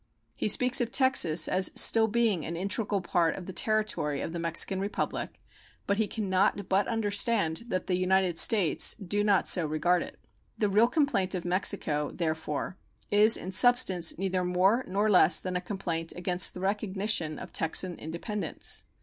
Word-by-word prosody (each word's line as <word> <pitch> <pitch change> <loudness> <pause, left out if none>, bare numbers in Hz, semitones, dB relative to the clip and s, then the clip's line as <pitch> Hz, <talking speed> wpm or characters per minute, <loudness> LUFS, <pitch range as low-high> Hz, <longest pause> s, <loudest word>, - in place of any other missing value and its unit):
He - - -3
speaks 250 +5 +4
of 240 -1 -3
Texas 175 - +2
as 185 0 +1
still 225 -1 +5
being 220 -6 0
"an 170 - -6
integral 200 +2 -2
part 175 -3 0
of 185 - -9
the 190 - -8
territory 215 -8 0
of 165 - -6
the 170 - -5
Mexican 170 +3 +1
Republic," 200 +2 -4 0.5
but 200 - -1
he 220 -1 0
can 215 0 -5
not 190 +1 0
but 195 +2 0
understand 210 -4 -1
that 185 -5 -3
the 185 - -3
United 185 -1 +1
States 200 -8 +4
do 205 +1 -3
not 200 -3 +1
so 170 -3 +3
regard 170 +4 0
it. - - -9 0.4
The 210 - 0
real 210 +4 +3
complaint 245 - -1
of 180 - -6
Mexico, 175 -5 -1
therefore, 160 +1 -4 0.3
is 210 +2 +5
in 185 - -7
substance 190 -6 +3
neither 185 0 -2
more 185 +7 +1
nor 200 +3 -1
less 180 -4 +4
than 185 -1 -5
a 180 - -2
complaint 170 -5 -5
against 180 +1 0
the 180 - -8
recognition 195 -4 -2
of - - -11
Texan 175 +2 0
independence. 170 +3 -5
190 Hz, 170 wpm, -27 LUFS, 175-210 Hz, 0.5 s, still